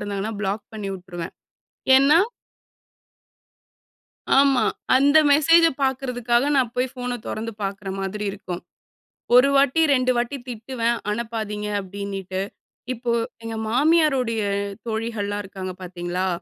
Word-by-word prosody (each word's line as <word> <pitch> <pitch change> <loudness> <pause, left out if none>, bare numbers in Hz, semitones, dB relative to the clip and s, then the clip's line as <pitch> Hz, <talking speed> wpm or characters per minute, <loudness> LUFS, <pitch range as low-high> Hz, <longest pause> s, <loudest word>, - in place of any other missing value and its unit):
இருந்தாங்கன்னா 205 +1 -3
பிளாக் 205 +1 -2
பண்ணிவுட்டுருவேன். 190 -5 -6 0.6
ஏன்னா 280 +4 +6 2.2
ஆமா. 275 -1 +5 0.3
அந்த 285 +3 +5
மெசேஜ 330 +3 +6 0.2
பாக்குறதுக்காக, 250 -2 +1
நான் 245 -3 +2
போய் 255 +1 +1
ஃபோனை 245 -1 -4
தொறந்து 225 +1 -4
பாக்குற 195 0 -4
மாதிரி 210 +2 -3
இருக்கும். 185 -3 -7 0.7
1 250 +3 +7
வாட்டி, 275 +3 +3
2 255 0 +2
வாட்டி 240 +4 -1
திட்டுவேன். 235 0 -2
அனுப்பாதீங்க 215 -2 -3
அப்படின்னுட்டு. 195 -1 -5 0.5
இப்போ 240 0 -3 0.3
எங்க 225 0 -5
மாமியாரோடைய 270 -4 +2 0.5
தோழிகள்லாம் 220 -2 -2
இருக்காங்க 190 -1 -6
பாத்தீங்களா! 180 +1 -3
225 Hz, 100 wpm, -23 LUFS, 200-255 Hz, 2.2 s, 1